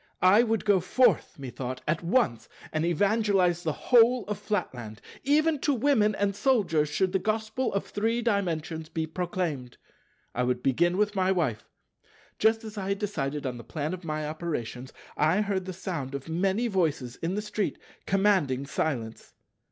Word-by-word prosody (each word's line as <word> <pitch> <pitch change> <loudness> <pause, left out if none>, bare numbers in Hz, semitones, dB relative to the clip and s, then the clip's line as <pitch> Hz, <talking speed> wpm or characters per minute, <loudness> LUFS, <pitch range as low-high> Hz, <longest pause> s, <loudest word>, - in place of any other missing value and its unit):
I 190 +5 +7
would 225 -3 0
go 200 -2 +4
forth, 205 - +2
methought, 130 -1 -6
at 155 +2 0
once, 170 - +1 0.2
and 155 0 0
evangelize 190 0 +2
the 165 -3 -1
whole 240 - +4
of 205 0 -4
Flatland. 125 - -3 0.2
Even 300 +2 +3
to 285 0 +1
Women 225 -5 +3
and 200 -1 0
Soldiers 200 - +2
should 185 +6 +1
the 190 - +2
Gospel 220 +5 -1
of 200 - -1
Three 230 +3 -1
Dimensions 165 -7 -1
be 160 -1 -2
proclaimed. 165 - -3 0.6
I 125 - -1
would 125 0 0
begin 175 +7 +2
with 210 0 +1
my 190 0 +2
Wife. 155 - -1 0.7
Just 225 +1 +3
as 215 -1 -7
I 190 0 -3
had 200 - 0
decided 150 -9 -3
on 125 -2 -3
the 115 - -9
plan 150 +7 -3
of 185 0 -7
my 155 -2 -3
operations, 150 -6 -4 0.3
I 160 +7 +3
heard 195 -3 -1
the 190 - -4
sound 165 -7 -5
of 140 +1 -6
many 195 +8 0
voices 160 - -1
in 170 +3 -2
the 210 - -1
street 210 -1 -2 0.3
commanding 190 -10 +2
silence. 130 -6 -3
185 Hz, 165 wpm, -27 LUFS, 150-210 Hz, 0.7 s, I